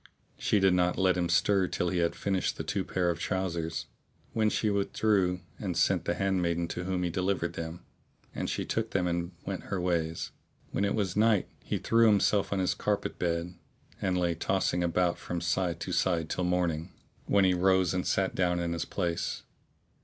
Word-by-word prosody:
She 105 - +1
did 95 -1 +4
not 90 0 +2
let 95 -1 +3
him 90 -1 0
stir 95 +2 +3
till 90 - -1
he 90 - 0
had 85 -1 +1
finished 95 -2 -1
the - - -3
two - - -1
pair 90 -2 0
of 85 - -5
trousers, 85 -3 -2 0.5
when 110 -1 +2
she 105 0 0
with 100 -1 -1
drew 95 -4 +2 0.2
and 90 -5 -3
sent 90 0 +2
the 85 - 0
handmaid 85 -3 0
to 90 - -4
whom 90 -1 -1
he 90 - -1
delivered 90 -1 -1
them; 80 +1 -6 0.5
and - - -3
she - - -2
took 115 0 -1
them 90 -2 0
and 85 0 -1
went - - -4
her 95 - -2
ways. 85 -2 -1 0.4
When 100 - 0
it 100 - 0
was 100 -4 -1
night, 105 -2 +3 0.2
he - - -2
threw 115 0 +4
himself 105 -1 +3
on 100 - 0
his 95 -1 +1
carpet 105 -1 -2
bed, 85 0 -1 0.5
and 95 -1 +1
lay 85 -1 +1
tossing 90 +1 0
about 85 0 +1
from 85 - -4
side 85 0 0
to - - -4
side 85 -4 +1
till 90 - -1
morning, 85 -3 0 0.4
when 100 -1 +4
he 95 - +4
rose 95 0 +3
and 90 0 -1
sat 95 -1 +1
down 90 -1 +1
in 85 -1 -1
his 85 - -2
place. 85 -3 -2
90 Hz, 200 wpm, -29 LUFS, 85-95 Hz, 0.5 s, did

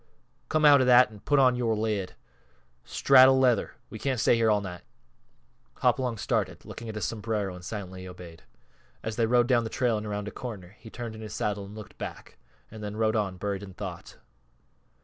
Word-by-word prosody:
_ - - -41
Come 155 -1 +2
out 145 -2 +8
of 130 - +2
that 125 -2 +6
an' 105 - -12
put 145 +7 +1
on 130 -2 +5
yore 115 -2 0
lid! 105 -3 -2 0.7
Straddle 130 -1 +6
leather 125 -3 +2 0.2
we 110 - -7
can't 130 -1 -1
stay 120 - +4
here 115 -1 +2
all 105 -1 +3
night." 90 -3 -7 0.9
Hopalong 125 -3 +1
started, - - -2
looked - - -9
at 110 -2 -7
his 105 -4 -2
sombrero 105 -3 -2
and 90 0 -11
silently 95 -2 -7
obeyed. 90 -3 -11 0.6
As 110 -1 -4
they 115 -1 +1
rode 120 +1 +4
down 120 -2 +2
the 110 - -4
trail 120 -3 0
and 105 - -7
around 105 0 -4
a - - -5
corner 100 -7 -8
he 115 - -12
turned 115 -1 -6
in 110 - -10
his 105 -1 -7
saddle 100 -1 -2
and 100 +2 -11
looked 110 -2 -11
back; - - -8 0.3
and 110 -1 -9
then 105 0 -5
rode 110 0 +1
on, 100 -4 -1
buried 100 0 -3
in 95 -2 -10
thought. - - -8
110 Hz, 205 wpm, -27 LUFS, 100-120 Hz, 0.9 s, out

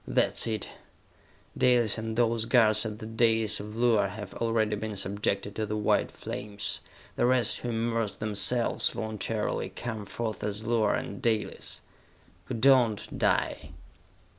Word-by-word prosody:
"That's - - +2
it! 110 -2 -2 0.9
Dalis 120 -4 +3
and 110 0 -4
those 115 -1 +2
guards 110 -2 +4
at 105 -1 -6
the 110 - -8
dais 115 -1 +2
of 105 +1 -7
Luar 115 -4 +3
have 105 0 -8
already 115 -2 0
been 105 -1 -5
subjected 100 +1 -2
to 110 -1 -1
the 105 +1 -2
white 105 - +2
flames! 105 -1 -4 0.4
The - - +3
rest 125 -1 +2
who 120 - -4
immerse 115 -2 -1
themselves, 110 +3 +2
voluntarily, 110 0 -2
come 110 -4 -6
forth 110 +1 -4
as 105 +1 -3
Luar 115 -2 +2
and - - -5
Dalis! 115 -4 -2 0.6
Who - - -4
do 120 +5 +4
not, 120 -5 +2
die. - - 0
110 Hz, 145 wpm, -28 LUFS, 105-115 Hz, 0.9 s, guards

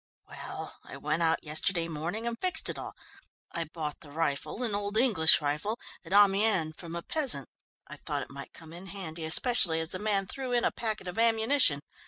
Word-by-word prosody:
"Well, - - -9
I - - -11
went 155 +3 -2
out 165 0 +1
yesterday 165 +3 0
morning 170 +8 -4
and 235 0 -2
fixed 360 -3 +2
it - - -4
all. - - -8 0.6
I 165 - -3
bought 155 -1 -6
the 150 - -13
rifle, 155 - -3
an 225 -4 -2
old 205 +1 -3
English 210 -12 +4
rifle, 150 +10 -3 0.2
at 170 - -14
Amiens 200 -4 +3
from 170 0 -9
a 170 - -6
peasant. 260 - 0 0.4
I - - -11
thought - - -4
it - - -13
might 140 +1 -10
come 160 0 -14
in 180 +3 -11
handy, 170 -4 -6
especially 170 -1 +7
as 160 0 -4
the 185 - -6
man 205 -2 0
threw 255 +5 -6
in 240 - +1
a - - +1
packet 220 -4 -5
of 180 +4 -5
ammunition. 225 - +3
180 Hz, 200 wpm, -28 LUFS, 160-220 Hz, 0.6 s, especially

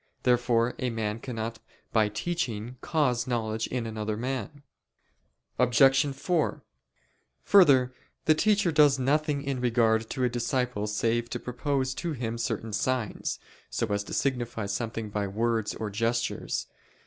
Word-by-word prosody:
Therefore 120 -1 +2
a 130 - 0
man 110 -1 -2
cannot 115 -2 -5 0.3
by 110 -2 +3
teaching 120 -3 -3
cause 130 -7 +1
knowledge 110 -2 -1
in 125 -2 -3
another 110 -1 -3
man. 135 +4 -4 1.0
Obj. 135 +3 +5
4: 165 +2 0 0.8
Further, 135 -10 +6 0.3
the 155 - +6
teacher 200 +2 +2
does 150 -3 +5
nothing 145 +2 +1
in 135 -2 -2
regard 115 -2 +2
to 130 - -2
a - - +4
disciple 120 -2 -1
save 115 +2 0
to 120 - -3
propose 130 +2 -1
to 170 +4 -3
him 115 -3 -3
certain 115 -2 -3
signs, 110 +1 -1 0.3
so - - -1
as 100 0 0
to - - -7
signify 120 -5 -1
something 110 +1 -3
by 100 -1 -1
words 110 +2 -1
or 110 -2 -4
gestures. 115 +3 -1
120 Hz, 135 wpm, -28 LUFS, 110-135 Hz, 1.0 s, Further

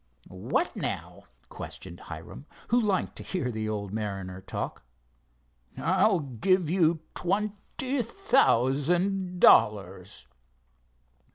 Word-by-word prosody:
"What, 90 +1 -1
now?" - - -3 0.2
questioned 90 -2 -8
Hiram, 85 - -10 0.2
who 240 +2 +4
liked 205 -4 0
to - - -6
hear 155 -10 -2
the 110 -1 -3
odd - - -1
old 100 -2 -5
mariner 95 -4 -4
talk. 95 - -5 1.0
"I'll 185 +2 +3
give 155 - +1
you 165 -3 +3
twenty 210 +7 -1
thousand 180 - +1
dollars." 95 - +3
155 Hz, 100 wpm, -28 LUFS, -, 1.0 s, who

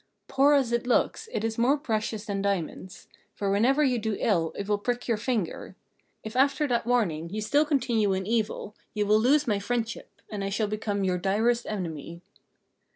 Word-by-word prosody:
"Poor 280 +2 +4
as 265 -4 +2
it 235 +1 0
looks, 445 - +1
it 210 - -2
is 225 0 -2
more 260 +5 +4
precious 220 -5 -2
than 200 -2 -2
diamonds; 190 -1 -3 0.3
for 200 -1 -1
whenever 255 +9 +3
you 255 -4 +2
do 220 -1 -2
ill 165 -7 +1
it 200 - -4
will 205 -1 +1
prick 245 +3 -2
your 230 - +2
finger. 215 -5 -3 0.5
If 220 +1 -7
after 275 +2 +3
that 235 -1 0
warning 175 -10 +1
you 210 +4 -4
still 285 +9 +2
continue 240 -8 +1
in 190 0 -2
evil, 215 -1 -1 0.2
you 210 -1 +1
will 210 +1 +4
lose 280 +6 +3
my 210 -5 +1
friendship, 230 +1 -3 0.2
and 205 -2 -3
I 195 - -1
shall 210 +2 0
become 210 -1 -2
your 180 -1 0
direst 225 +6 +1
enemy." 170 -4 -5
220 Hz, 190 wpm, -27 LUFS, 200-245 Hz, 0.5 s, Poor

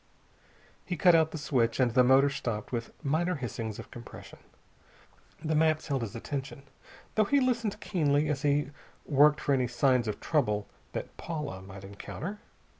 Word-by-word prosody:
He 180 - -4
cut 175 +2 +6
out 160 -1 +4
the 160 - -6
switch 125 -6 0
and 125 -2 +3
the 125 +2 +5
motor 135 +2 +5
stopped 115 -6 -4
with 115 -2 -3
minor 170 +6 +1
hissings 115 -5 -4
of - - -10
compression. 120 -1 -11 1.1
The 155 - +1
maps 155 0 +2
held 135 -3 0
his 115 -2 -5
attention, 135 +3 -5 0.5
though 215 - +3
he 280 +7 +3
listened 235 -5 0
keenly 150 -5 +1
as 145 -2 -1
he 145 0 +1 0.3
worked 150 +1 +5
for 140 - +1
any 130 -2 +2
signs 120 0 +2
of 105 - -3
trouble 105 -10 0 0.3
that - - -5
Paula 150 - -5
might 95 0 -11
encounter. 145 - -7
140 Hz, 165 wpm, -29 LUFS, 120-155 Hz, 1.1 s, cut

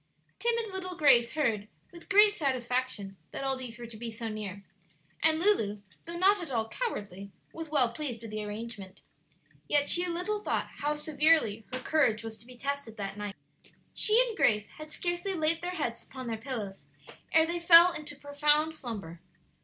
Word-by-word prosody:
Timid 465 -3 0
little 370 -2 -5
Grace 240 -6 +5
heard, 225 -9 0 0.2
with 340 -1 -14
great 415 +1 +6
satisfaction, 255 - -2
that - - -6
all 270 0 0
these 250 -3 -8
were 240 - -8
to 225 -1 -9
be 235 +1 -5
so 225 0 -5
near; 205 -2 -6 0.6
and 315 0 +4
Lulu, 220 - +2 0.2
though 340 +1 -5
not 390 +2 +4
at 335 - -6
all 225 -4 -1
cowardly, 200 - -5 0.2
was 325 -1 -7
well 255 -6 +2
pleased 240 -5 -3
with 225 - -8
the 215 0 -3
arrangement. 210 -2 -7 0.7
Yet 290 -1 +2
she 350 +1 +3
little 360 +5 -2
thought - - -1
how 295 +1 0
severely 300 -8 +2
her 255 - -2
courage 250 -5 +1
was 225 -1 -6
to 230 - -16
be 250 -1 -13
tested 280 -4 -4
that 195 -1 -4
night. 205 -1 -6 0.6
She 435 +1 +4
and 455 - -5
Grace 210 - +2
had 310 0 -8
scarcely 350 +4 -2
laid 320 0 +2
their 360 +1 -4
heads 240 -8 -3
upon 260 -1 -9
their 230 -2 -3
pillows 220 -5 -6 0.4
ere 320 0 +5
they 340 +1 -2
fell 340 +1 +9
into 300 -3 -6
profound 295 +2 +1
slumber. 205 - -6
275 Hz, 180 wpm, -29 LUFS, 225-335 Hz, 0.7 s, fell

